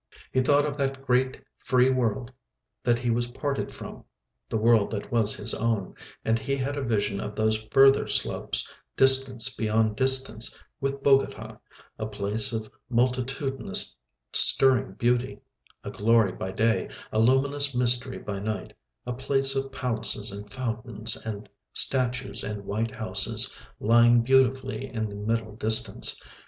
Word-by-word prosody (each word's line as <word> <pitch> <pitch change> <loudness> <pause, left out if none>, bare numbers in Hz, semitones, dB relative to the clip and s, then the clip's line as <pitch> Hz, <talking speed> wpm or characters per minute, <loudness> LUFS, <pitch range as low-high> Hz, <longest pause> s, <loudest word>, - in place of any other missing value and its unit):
He 130 - 0
thought 145 +2 +2
of 145 -1 -5
that 135 0 -3
great 130 0 0 0.2
free 125 0 +1
world 125 -1 -2 0.5
that 120 -1 +1
he 120 0 -2
was 120 +1 -1
parted 140 +3 -4
from, - - -11 0.5
the - - -2
world 110 -1 +2
that 105 -2 -7
was 115 -3 +1
his 105 +2 -2
own, 110 -4 -2 0.3
and 115 +1 +1
he 135 +5 -3
had 140 +1 -4
a 145 - -4
vision 105 -5 -2
of 105 0 -7
those 110 0 0
further 135 0 +4
slopes, - - -1 0.3
distance 135 -2 +4
beyond 110 -1 0
distance, 130 -3 +2 0.2
with 135 0 -4
Bogota, 135 -1 0 0.4
a - - -4
place 105 +2 0
of 110 -2 -5 0.2
multitudinous 130 +2 0 0.4
stirring 130 -7 +5
beauty, 120 +4 -1 0.4
a - - -7
glory 110 -2 +2
by 95 - -7
day, 110 +4 -1 0.2
a 110 - -1
luminous 135 +3 +1
mystery 125 +1 0
by 100 -2 -6
night, 105 +1 -5 0.3
a 125 - -4
place 135 +1 0
of 135 0 -3
palaces 115 -4 +2
and 100 +1 -9
fountains 115 -3 -1
and 105 -1 -8 0.3
statues 130 0 +3
and 105 -1 -6
white 110 +3 -4
houses, 110 -1 +3 0.2
lying 120 +1 +4
beautifully 130 +1 0
in 110 -3 -4
the 100 - -9
middle 110 +1 -4
distance. 110 0 +2
120 Hz, 145 wpm, -25 LUFS, 110-130 Hz, 0.5 s, stirring